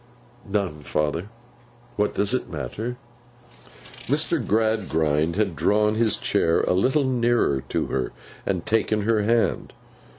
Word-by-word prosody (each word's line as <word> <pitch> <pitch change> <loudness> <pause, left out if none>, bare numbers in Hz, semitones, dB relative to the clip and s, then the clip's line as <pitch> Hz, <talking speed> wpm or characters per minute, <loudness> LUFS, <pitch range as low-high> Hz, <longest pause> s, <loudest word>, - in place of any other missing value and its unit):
'None, 100 -6 -1
father. 75 +5 -2 0.7
What 105 0 0
does 100 +3 +2
it 130 - -1
matter!' 95 - -5 1.1
Mr. - - +1
Gradgrind 85 -8 +1
had 100 -4 0
drawn 105 +7 +2
his 110 -1 +2
chair 80 0 +2
a - - +1
little 130 +10 +2
nearer 120 - +1
to - - 0
her, 65 -1 -2 0.3
and 90 -3 -2
taken 110 -1 +1
her 110 0 +2
hand. 115 +2 +1
105 Hz, 125 wpm, -24 LUFS, 80-110 Hz, 1.1 s, does